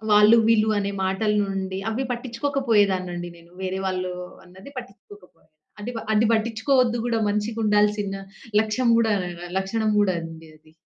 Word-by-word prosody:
వాళ్ళు 210 +2 +7
వీళ్ళు 220 -1 +4
అనే 200 0 -2
మాటల 195 +3 0
నుండి 190 -1 -3
అవి 245 +4 -2
పట్టించుకోకపోయేదాన్నండి 225 -8 0
నేను. 170 0 -19
వేరే 190 0 -2
వాళ్ళు 185 -1 -2 0.3
అన్నది 190 +8 -14
పట్టించుకోకపోయేదాన్ని. 200 -7 -14 0.3
అది 215 +4 -5
ప - - -2
అది 220 +1 +3
పట్టించుకోవద్దు 230 +2 +2
కూడా 230 -1 0
మనిషికి 210 +2 -2
ఉండాల్సిన 210 -1 +2 0.5
లక్ష్యం 220 +3 0
కూడా 225 -2 +2 0.5
లక్షణం 215 +3 -1
కూడా 200 -2 +3
అండి 165 0 -9
అది. 155 0 -24
210 Hz, 140 wpm, -24 LUFS, 190-225 Hz, 0.5 s, వాళ్ళు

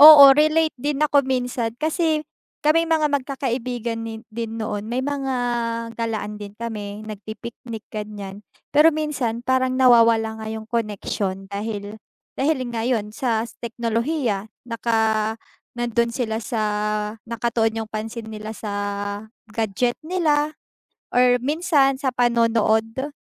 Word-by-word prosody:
Oo, 285 -2 +12
relate 310 +2 +3
din 295 +2 +1
ako 290 -1 +5
minsan 250 -3 -1
kasi 315 +1 +1 0.4
kaming 330 +2 +4
mga 310 -3 +2
magkakaibigan 250 -4 -2
ni 225 +1 -6
din 225 0 -4
noon 210 -1 -3
may 255 +3 -1
mga 275 -2 -1 0.6
galaan 215 -2 -3
din 205 0 -8
kami 215 -2 -5
nagpi-picnic, 220 +2 -8
ganyan. 205 -2 -6 0.3
Pero 300 +3 +7
minsan 285 -7 -1
parang 260 0 +2
nawawala 230 -3 +5
nga 220 - -6
'yong 220 0 -5
koneksyon 205 -3 -2
dahil, 205 0 -4 0.4
dahil 300 +1 +2
nga 230 +1 -1
'yon 215 -4 0
sa 230 -4 0 0.2
teknolohiya 230 -1 -1 0.2
naka 220 -2 +1 0.4
nandon 235 0 +1
sila 230 -2 -2
sa 220 0 -2 0.7
nakatuon 225 -1 0
yung - - -17
pansin 220 +1 -5
nila 215 0 -6
sa 210 -2 -5 0.8
gadget 225 +2 0
nila 310 -4 +1 0.5
or 245 0 +4
minsan 290 -1 +2
sa 265 -1 -1
panonood. 230 +1 +2
235 Hz, 120 wpm, -23 LUFS, 220-270 Hz, 0.8 s, Oo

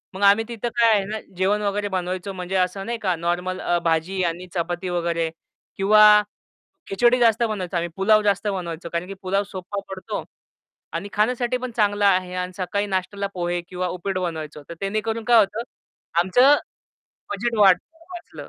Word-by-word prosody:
मग 195 - -6
आम्ही 205 +3 +5
तिथं 235 0 -4
काय 230 -2 +5
आहे 200 -2 +2
ना, 215 +1 -4 0.2
जेवण 200 +3 +1
वगैरे 205 0 -1
बनवायचो. 185 +1 -3
म्हणजे 185 +1 -5
असं 185 +1 0
नाही 235 0 -3
का, 185 -4 +1
नॉर्मल 175 +2 -2
अ, 175 - +1
भाजी 165 +3 0
आणि 175 +2 -3
चपाती 175 +1 -2
वगैरे, 170 -2 -1 0.5
किंवा 210 +1 +7 0.7
खिचडी 240 +5 +3
जास्त 230 0 +4
बनवायचो 190 -6 -2
आम्ही. 170 0 -2
पुलाव 215 +2 +4
जास्त 205 0 +1
बनवायचो, 170 -4 -4
कारण 170 +2 -2
की 195 - -6
पुलाव 195 +2 0
सोप्पा 195 +1 -5
पडतो 195 +3 -5 0.7
आणि 205 - -4
खाण्यासाठी 245 +3 +1
पण 250 -1 -5
चांगला 205 -1 +3
आहे. 185 -1 0
आणि 180 0 -3
सकाळी 200 +2 -1
नाश्त्याला 200 +1 -2
पोहे 175 -1 -2
किंवा 180 0 -2
उपीट 185 +2 -3
बनवायचो. 155 -4 -5
तर - - -5
त्यामुळे 215 +3 -2
काय 240 -1 +6
होतं, 215 +3 +1 0.6
आमचं 250 +10 +5 0.8
बजेट 225 +3 -2
वाट 190 -3 +7 0.4
वाचलं. 345 -1 -9
195 Hz, 170 wpm, -23 LUFS, 180-210 Hz, 0.8 s, किंवा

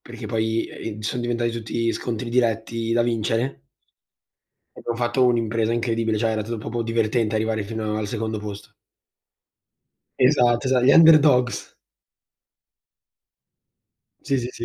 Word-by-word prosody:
perché - - -9
poi, 110 0 -1
ehm, 110 -1 -7
son 115 +3 -3
diventati 120 0 -1
tutti 115 0 -2
scontri 115 0 -4
diretti 115 -1 0
da 120 0 +3
vincere. 115 - -1 1.2
Abbiamo 120 - -4
fatto 120 +2 +1
un'impresa 115 -1 0
incredibile, 115 -1 -1
cioè 115 +1 +1
era 110 -1 -1
tu 115 +2 -5
proprio 115 +2 -4
divertente 115 -1 0
arrivare 110 0 -1
fino 110 0 -3
al 110 -1 -2
secondo 110 0 -3
posto. 105 -1 -8 1.5
Esatto, 125 -2 +3
esa 130 -1 +2
gli 135 +3 +5
Underdogs. 150 -6 +5 2.5
Sì, 140 -1 0
sì, 120 0 -3
sì. 115 - -7
115 Hz, 125 wpm, -23 LUFS, 110-120 Hz, 2.5 s, gli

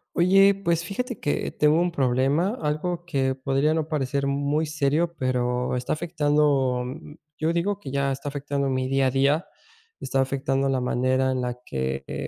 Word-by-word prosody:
Oye, 195 +3 +5
pues 170 -4 0
fíjate 245 +6 -4
que 145 - -1
tengo 150 +2 +3
un 175 0 +1
problema, 140 - +1
algo 170 +4 -2
que 135 -6 0
podría 135 +3 +1
no 160 -1 -1
parecer 140 -3 -1
muy 140 +3 0
serio, 155 +2 0
pero 125 -1 0
está 125 - -2
afectando, 145 -6 +1 0.5
yo 160 +2 0
digo 195 +4 -1
que 135 - -8
ya 140 0 0
está 135 +2 -5
afectando 140 -1 -2
mi 130 0 -1
día 135 0 +2
a - - +1
día, 140 +6 +2 0.5
está 135 - -1
afectando 135 0 0
la 135 -1 0
manera 130 +1 +1
en 130 -1 -1
la 125 0 -3
que, 65 - -3
eh, - - -4
140 Hz, 170 wpm, -25 LUFS, 130-160 Hz, 0.5 s, Oye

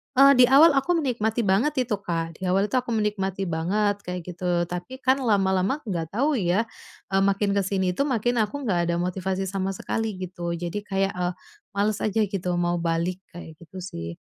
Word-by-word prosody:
Eee, 275 +1 +7
di 250 - +8
awal 280 +4 +6
aku 310 +6 +2
menikmati 240 -8 0
banget 210 +8 +2 0.2
itu 210 - +1
Kak 165 -4 -4
di 190 - -5
awal 195 +3 +2
itu 260 - +1
aku 245 -2 -1
menikmati 195 -3 -1
banget 200 +6 0
kayak 180 0 -4
gitu 180 +1 -7 0.2
tapi 215 +10 -6
kan 260 +1 +3
lama-lama 200 +1 +1
nggak 165 -3 -3
tahu 280 +6 +1
ya, 200 +3 +1 0.4
eee, 195 - +1
makin 200 +1 0
ke - - +3
sini 190 -1 0
itu 280 - +2
makin 245 -3 0
aku 220 +6 0
nggak 205 -10 0
ada 170 0 0
motivasi 190 +1 -2
sama 195 0 -2
sekali 220 +3 -3
gitu 175 -2 -4
jadi 170 +2 -4
kayak, 195 -1 0
eee, 180 0 -1 0.4
males 205 +1 +1
aja 220 +1 +1
gitu 190 -3 -3 0.2
mau 175 0 0
balik 170 +1 -1 0.2
kayak 160 -2 -10
gitu 175 +3 -10
sih. 85 - -6
195 Hz, 195 wpm, -25 LUFS, 180-225 Hz, 0.4 s, di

